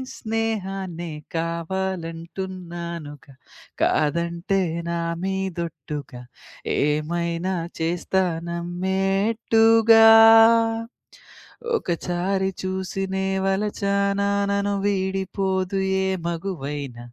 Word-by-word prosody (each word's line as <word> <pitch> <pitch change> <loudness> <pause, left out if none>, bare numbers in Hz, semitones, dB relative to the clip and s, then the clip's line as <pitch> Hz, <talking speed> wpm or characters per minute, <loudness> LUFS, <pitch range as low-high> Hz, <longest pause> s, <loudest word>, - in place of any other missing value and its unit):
స్నేహాన్నే 195 -6 -3 0.2
కావాలంటున్నానుగ. 170 -2 -4 0.6
కాదంటే 170 +5 +1 0.3
నా 170 0 -1 0.2
మీదొట్టుగ 170 -7 -4 0.7
ఏమైనా 170 +4 -1 0.2
చేస్తా 175 +3 0 0.3
నమ్మేట్టుగా. 210 +6 +3 1.7
ఒకచారి 185 - -1
చూసినే 190 0 -2 0.2
వలచనా 200 0 0 0.2
నను 200 0 0
వీడిపోదు 190 -1 -1 0.3
ఏ - - 0 0.2
మగువైన, 150 -7 -4
190 Hz, 55 wpm, -23 LUFS, 170-195 Hz, 1.7 s, నమ్మేట్టుగా